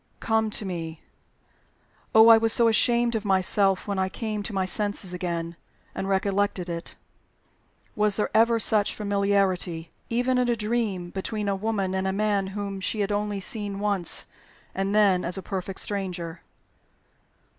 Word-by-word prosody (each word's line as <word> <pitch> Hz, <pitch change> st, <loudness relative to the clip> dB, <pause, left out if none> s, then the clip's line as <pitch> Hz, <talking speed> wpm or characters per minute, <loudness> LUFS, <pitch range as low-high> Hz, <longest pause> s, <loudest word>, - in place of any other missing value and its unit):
Come 220 Hz, -1 st, +1 dB
to 210 Hz, -, -3 dB
me.' 165 Hz, -3 st, -5 dB, 1.1 s
Oh, 220 Hz, +1 st, +9 dB
I 225 Hz, -, +9 dB
was 225 Hz, 0 st, +2 dB
so 235 Hz, 0 st, +4 dB
ashamed 235 Hz, +1 st, +3 dB
of 220 Hz, -2 st, -2 dB
myself 195 Hz, 0 st, +2 dB
when 200 Hz, -2 st, -1 dB
I 190 Hz, 0 st, 0 dB
came 215 Hz, +1 st, -4 dB
to 210 Hz, -, -5 dB
my 190 Hz, -2 st, 0 dB
senses 200 Hz, -1 st, -1 dB
again, 170 Hz, -2 st, -3 dB, 0.4 s
and 190 Hz, -, -4 dB
recollected 195 Hz, -1 st, 0 dB
it. 170 Hz, 0 st, -6 dB, 1.0 s
Was 210 Hz, -1 st, +2 dB
there 210 Hz, -, 0 dB
ever 230 Hz, +1 st, +4 dB
such 210 Hz, -2 st, +2 dB
familiarity 200 Hz, -5 st, 0 dB, 0.2 s
even 250 Hz, +2 st, +1 dB
in 250 Hz, -1 st, +1 dB
a 240 Hz, -, +2 dB
dream 210 Hz, -5 st, -2 dB
between 205 Hz, +2 st, -3 dB
a 200 Hz, -, +1 dB
woman 195 Hz, -2 st, -1 dB
and 190 Hz, 0 st, -1 dB
a 190 Hz, -, 0 dB
man 205 Hz, -1 st, 0 dB
whom 200 Hz, 0 st, -5 dB
she 210 Hz, +3 st, -1 dB
had 200 Hz, +1 st, -1 dB
only 205 Hz, 0 st, -1 dB
once 195 Hz, -, -4 dB
seen, 205 Hz, -3 st, -2 dB, 0.7 s
and 195 Hz, +2 st, -1 dB
then 195 Hz, -4 st, +4 dB
as 175 Hz, +3 st, -2 dB
a 190 Hz, -, -6 dB
perfect 190 Hz, 0 st, -5 dB
stranger?" 180 Hz, -4 st, -3 dB
200 Hz, 160 wpm, -25 LUFS, 190-215 Hz, 1.1 s, Oh